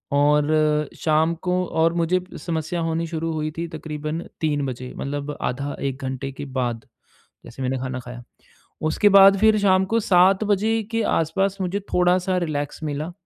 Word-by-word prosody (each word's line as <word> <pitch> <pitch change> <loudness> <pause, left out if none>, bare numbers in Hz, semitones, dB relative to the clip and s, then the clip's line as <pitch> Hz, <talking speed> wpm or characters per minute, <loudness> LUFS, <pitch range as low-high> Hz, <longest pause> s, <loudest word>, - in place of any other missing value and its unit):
और 150 +1 +2
शाम 160 +1 +2
को 180 0 +1
और 165 +1 +1
मुझे 170 +2 +1 0.2
समस्या 165 +1 -3
होनी 165 0 -1
शुरू 165 0 -3
हुई 155 0 -2
थी 170 +1 -3
तकरीबन 155 0 -5 0.2
3 145 -3 0
बजे 125 0 -6
मतलब 145 +1 -4
आधा 140 +3 -3
1 135 +1 -5
घंटे 130 +1 -4
के 145 +2 -7
बाद, 125 -4 -3 0.6
जैसे 130 +3 -10
मैंने 130 +1 -1
खाना 130 0 -4
खाया। 120 0 -9 0.7
उसके 205 +6 +3
बाद 195 0 +8
फिर 220 0 +5
शाम 190 -1 +3
को 225 +4 +1
7 190 +1 +4
बजे 215 +2 +1
के 230 0 0
आसपास 195 +5 0
मुझे 185 +2 -1
थोड़ा-सा 180 +1 +2
रिलैक्स 150 -3 -3
मिला 150 +3 -3
160 Hz, 165 wpm, -23 LUFS, 145-180 Hz, 0.7 s, बाद